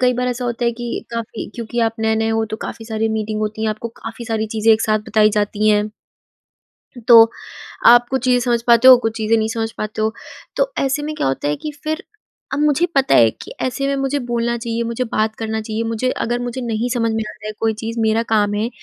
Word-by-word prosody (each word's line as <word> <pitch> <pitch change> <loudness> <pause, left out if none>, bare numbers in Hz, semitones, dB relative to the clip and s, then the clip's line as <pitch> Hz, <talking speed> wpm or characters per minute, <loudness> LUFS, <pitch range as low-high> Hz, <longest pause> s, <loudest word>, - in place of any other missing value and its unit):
कई 250 0 +4
बार 250 +1 -1
ऐसा 245 0 -3
होता 240 0 -2
है 235 - +2
कि 240 0 -5
काफ़ी 230 -1 -5
क्योंकि 235 0 -3
आप 225 -1 +1
नए 220 0 +2
नए 225 0 0
हो 225 0 +1
तो 220 0 -5
काफ़ी 225 - -7
सारी 220 0 -1
मीटिंग 215 -1 -2
होती 215 0 -3
हैं, 220 - +1
आपको 215 +2 -5
काफ़ी 230 +1 -7
सारी 220 -1 -2
चीज़ें 220 +1 +3
एक 220 - -2
साथ 215 0 +2
बताई 215 -1 +4
जाती 210 0 0
हैं। 210 0 +1 1.2
तो 230 -1 +9 0.6
आप 240 0 +7
कुछ 265 -1 -1
चीजें 250 -1 +4
समझ 240 -1 +1
पाते 235 +1 +6
हो, 255 - +11
कुछ 225 -2 -3
चीजें 220 0 +1
नहीं 220 0 0
समझ 225 0 -2
पाते 215 0 -3
हो। 220 0 +1 0.4
तो - - +1
ऐसे 275 +2 0
में 305 +1 -4
क्या - - -2
होता 135 +2 -1
है 150 - 0
कि 305 - -4
फिर 315 0 -3 0.5
अब 270 - -1
मुझे 300 +3 +3
पता 270 -1 +3
है 115 -1 +6
कि - - -9
ऐसे 265 +2 -2
में 280 - 0
मुझे 270 +1 -1
बोलना 235 0 -1
चाहिए, 230 0 -3
मुझे 235 +2 -2
बात 220 -1 -1
करना 220 -1 -3
चाहिए, 220 +1 -3
मुझे 230 +3 -1
अगर 240 0 -2
मुझे 245 +1 -4
नहीं 235 -1 -2
समझ 230 -2 0
में 220 0 -1
आता 210 - -12
है 215 - -3
कोई 225 -1 +1
चीज़ 230 +1 -4
मेरा 220 +1 +2
काम 205 -1 +2
है, 215 +2 -1
225 Hz, 240 wpm, -19 LUFS, 220-245 Hz, 1.2 s, हो